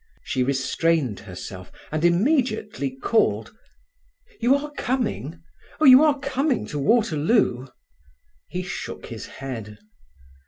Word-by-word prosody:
She 130 - -2
restrained 135 - 0
herself, 90 -1 -9 0.2
and 155 +1 -2
immediately 210 - +1
called: 230 - +1 0.8
"You 255 +3 +4
are 295 +1 -3
coming? 225 - -3 0.4
Oh, 310 - +3
you 260 +2 +9
are 300 -2 +3
coming 275 -1 -1
to 150 - -3
Waterloo?" 160 - +2 0.8
He 180 - -3
shook 180 - -6
his - - -8
head. 115 -6 -7
175 Hz, 110 wpm, -24 LUFS, -, 0.8 s, you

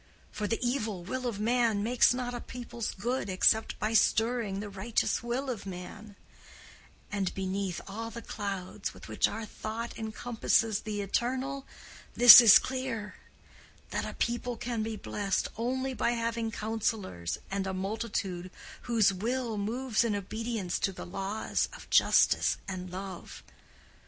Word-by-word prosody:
For 210 - -3
the 225 - -1
evil 215 -8 -2
will 255 +7 -3
of 215 -4 -3
man 225 -2 +2
makes 240 +2 +4
not 245 0 -2
a 240 - -5
people's 235 -2 -6
good 235 +1 -2
except 220 +4 +3
by 215 +1 -1
stirring 225 -1 +2
the 205 - -5
righteous 205 +3 -1
will 240 +4 -2
of 230 -6 -4
man; 195 +3 -8 1.0
and 200 -3 -1
beneath 190 -1 -2
all 225 +3 -5
the 235 +1 -8
clouds 195 -3 -5
with - - -12
which - - +2
our 225 0 -5
thought 225 +2 -6
encompasses 220 -1 0
the 210 -1 -4
Eternal, 260 +6 -2 0.5
this 245 0 +12
is 225 -3 +9
clear—that 255 -5 -3 0.9
a - - -6
people 240 0 -2
can 235 -1 -3
be 220 0 -3
blessed 200 -2 -2
only 260 +3 -2
by 240 -1 +1
having 230 -1 -1
counsellors 215 - -2
and 195 0 -1
a - - -1
multitude 190 -2 -3 0.4
whose 220 -5 +4
will 235 +4 -2
moves 230 +3 0
in 225 -3 0
obedience 215 -1 -3
to 195 - 0
the 185 - -8
laws 195 +4 -2
of - - -12
justice - - +4
and 185 -2 -5
love. 190 +1 -8
220 Hz, 145 wpm, -30 LUFS, 200-240 Hz, 1.0 s, this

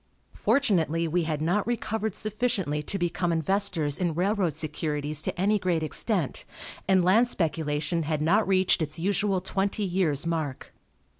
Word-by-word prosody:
Fortunately 170 - +1
we 170 +1 0
had 155 -1 -2
not 195 +7 +1
recovered 220 -3 -2
sufficiently 215 -9 -1
to 195 +6 -3
become 175 -1 -1
investors 165 -3 +1
in 175 -4 0
railroad 185 -3 +1
securities 150 -1 -2
to 175 - -4
any 205 +3 +2
great 175 -4 0
extent, 170 - -1 0.4
and 185 -2 +4
land 220 +7 +5
speculation 160 -4 -1
had 155 -1 -1
not 190 +8 +2
reached 185 -2 +3
its 155 -1 -3
usual 195 +2 0
twenty 195 +2 -1
years' 175 -6 0
mark. 160 -5 -3
175 Hz, 145 wpm, -27 LUFS, 155-200 Hz, 0.4 s, land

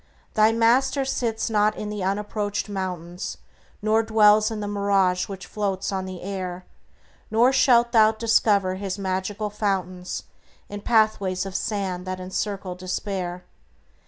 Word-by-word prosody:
Thy 215 0 +5
Master 250 +4 +3
sits 230 -4 -1
not 215 -1 +2
in 210 - -4
the 210 -2 -4
unapproached 205 +2 -2
mountains, 180 -3 -5 0.5
Nor 220 +1 +3
dwells 215 -1 +5
in 220 -1 -4
the 205 - -3
mirage 200 -3 +1
which 195 -1 -7
floats 195 -2 -2
on 190 -1 -2
the 185 -2 -7
air, 185 -2 -5 0.6
Nor 240 +4 +4
shalt 245 -3 +4
thou 220 -2 +6
discover 215 -4 +2
His 195 -1 -4
magical 195 +2 -2
fountains 185 -3 -2 0.5
In 205 0 -6
pathways 200 -5 +2
of 195 - -6
sand 190 -4 -2
that 185 0 -3
encircle 190 0 -3
despair. 180 0 -4
200 Hz, 135 wpm, -24 LUFS, 185-215 Hz, 0.6 s, thou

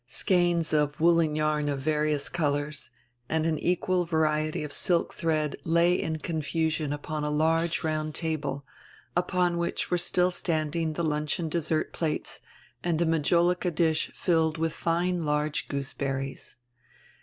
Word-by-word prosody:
Skeins 175 +2 +2
of 150 -1 +1
woolen 165 -2 +3
yarn 155 -1 +1
of 140 -1 -1
various 150 0 0
colors, 145 -2 -2 0.4
and 160 0 +1
an 160 -2 0
equal 180 0 +1
variety 155 -2 0
of 150 -1 -5
silk 175 -3 +2
diread 155 -3 0
lay 170 +2 +3
in 160 -3 -1
confusion 155 -1 -1
upon 150 +1 -4
a 150 - -1
large 160 +3 +1
round 155 -1 -2
table, 150 -4 -2 0.5
upon 180 0 +1
wiiich 170 0 -1
w - - -8
r - - +1
ere - - +4
still 180 +1 +2
standing 160 -2 -1
die 170 - -2
luncheon 150 +1 -1
dessert 155 -1 -1
plates 155 -3 -3 0.4
and 170 -2 0
a 170 - +2
majolica 170 +3 +2
dish 160 -1 +1
filled 160 -3 +1
with 160 0 -1
fine 175 +1 0
large 150 0 -1
goose 140 0 -3
berries. 135 -1 -4
160 Hz, 150 wpm, -27 LUFS, 150-170 Hz, 0.5 s, ere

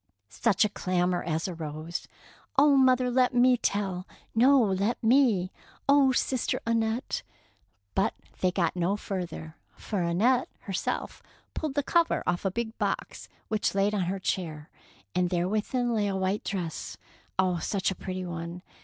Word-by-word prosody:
Such 220 - +2
a - - 0
clamour 180 -2 0
as 165 +1 -1
arose. 160 -1 -5 0.5
Oh, 285 0 +6
mother, 255 -2 +4
let 250 0 +3
me 250 +1 +6
tell.'' 195 -5 -1 0.2
'' - - -39
No, 275 +1 +7
let 205 +1 +1
me." 225 -7 +4 0.2
" - - -28
Oh, 280 -1 +6
sister 255 0 0
Annette 230 +1 0 0.3
— - - -38
" - - -46
But - - +1 0.2
they 185 - +3
got 175 -2 0
no 180 +3 +1
further, 175 -5 -5 0.2
for 205 -4 -3
Annette 210 +10 +2
herself 195 -3 -3 0.3
pulled 305 -4 -3
the 285 - +1
cover 340 +3 +2
off 175 +2 -1
a - - +3
big 225 +3 -3
box - - -3 0.2
which 215 -1 +1
was - - -9
laid 200 +1 +2
on 195 -4 0
her 190 +3 -1
chair, 160 -5 -3 0.4
and 180 0 +1
there 175 0 0
within 235 +4 0
lay 210 -2 +1
a 195 - -1
white 190 +2 0
dress 175 -6 -4 0.2
— - - -34
oh, 185 -2 +2
such 195 +3 0
a - - -1
pretty 185 0 -5
one 170 +1 -6
195 Hz, 170 wpm, -28 LUFS, 180-240 Hz, 0.5 s, No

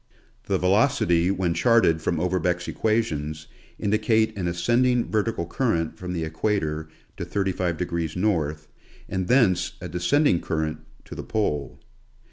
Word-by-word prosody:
The - - +1
velocity 90 -3 +3
when 95 -3 0
charted 85 -3 +3
from 80 0 -1
Overbeck's 90 0 0
equations 80 -9 -1 0.3
indicate 110 +1 +1
an 95 -3 -2
ascending 120 +8 +1
vertical 110 -5 0
current 85 -4 -1
from 90 0 -6
the 85 -2 -2
equator 80 -2 -2 0.3
to - - -4
35° 85 -4 -2
north, 80 -6 -1 0.4
and 95 -1 -2
thence 95 -9 +3
a 90 - -6
descending 90 - +2
current 80 -1 -2 0.3
to - - -9
the - - -5
pole. 75 -11 -2
90 Hz, 125 wpm, -25 LUFS, 80-110 Hz, 0.4 s, velocity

